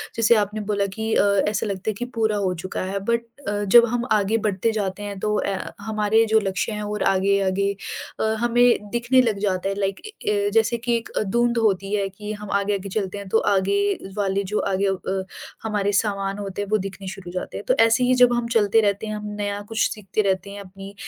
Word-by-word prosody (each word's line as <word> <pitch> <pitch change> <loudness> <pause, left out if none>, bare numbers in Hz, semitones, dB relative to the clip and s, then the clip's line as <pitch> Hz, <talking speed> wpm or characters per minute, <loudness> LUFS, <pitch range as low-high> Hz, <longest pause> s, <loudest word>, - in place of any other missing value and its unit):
जैसे 230 +1 +4
आपने 210 0 0
बोला 200 -1 +1
कि 220 0 -2
अ, - - +4 0.3
ऐसा 210 +1 -1
लगता 200 0 -3
है 215 - 0
कि 245 +5 -4
पूरा 220 -2 +1
हो 190 -2 0
चुका 185 - -4
है 200 - -1
बट 235 +3 0 0.2
अ, 205 0 -1
जब 235 +4 +7
हम 240 +1 -2
आगे 210 +2 +3
बढ़ते 205 +3 0
जाते 205 -2 -3
हैं 200 -1 -5
तो 210 +1 0
अ, 195 -1 -1 0.2
हमारे 220 0 +2
जो 220 0 +4
लक्ष्य 195 +2 -2
हैं 210 0 -4
और 210 0 -2
आगे-आगे 195 0 +2 0.5
अ, - - 0 0.2
हमें 240 -2 +3
दिखने 240 +2 +3
लग 225 -5 0
जाता 195 -1 0
है 195 - -2
लाइक 195 -1 -1
ए - - -9 0.2
ए 205 0 +1
जैसे 225 +1 +3
कि 235 0 0
एक 230 - -7 0.2
धुँध 240 0 +2
होती 200 -2 +1
है 200 -1 0
कि 210 +2 -7
हम 210 -1 -8
आगे-आगे 200 -1 -2
चलते 195 -1 -2
हैं 200 -1 -7
तो 225 - +3 0.2
आगे 195 +1 +1 0.4
वाले 200 -1 +1
जो 210 - 0
आगे 195 +1 +1
अ, 190 0 -2 0.4
हमारे 205 -2 0
सामान 200 -1 0
होते 200 0 -4
हैं 205 - -3
वो 215 - +3
दिखने 195 -1 -6
शुरू 185 -1 -7
हो - - -7
जाते 180 - -4
हैं। - - -6
तो - - +4
ऐसे 230 +2 +3
ही 250 +1 +3
जब 250 -1 +5
हम 240 -1 0
चलते 220 +1 +4
रहते 205 +1 0
हैं 215 - -3
हम 210 0 -6
नया 205 0 -2
कुछ 225 0 +1
सीखते 210 0 -2
रहते 195 0 0
हैं 200 - -8
अपनी 195 +1 -11
205 Hz, 230 wpm, -23 LUFS, 195-220 Hz, 0.5 s, जब